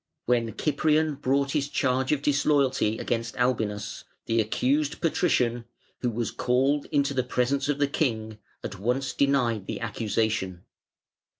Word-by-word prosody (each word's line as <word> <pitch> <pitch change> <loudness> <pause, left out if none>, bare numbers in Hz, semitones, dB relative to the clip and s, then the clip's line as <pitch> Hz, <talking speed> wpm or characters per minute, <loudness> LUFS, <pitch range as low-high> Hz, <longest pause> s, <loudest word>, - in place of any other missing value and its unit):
When 115 -3 0
Cyprian 155 +1 +2
brought 140 0 0
his 145 -1 0
charge 130 -1 +1
of 145 -2 0
disloyalty 140 -6 +2
against 115 -1 -3
Albinus, 110 -5 -1 0.2
the 115 0 +2
accused 140 +7 0
Patrician, 125 -8 +1 0.3
who 125 - 0
was 115 -1 -2
called 135 +4 +1
into 140 -1 +1
the 130 - +1
presence 125 +3 0
of 145 - +1
the 145 - +3
King, 110 -7 -2 0.2
at 105 - -6
once 125 +5 -1
denied 125 -7 +1
the - - -4
accusation. 110 -5 -1
125 Hz, 135 wpm, -26 LUFS, 115-140 Hz, 0.3 s, the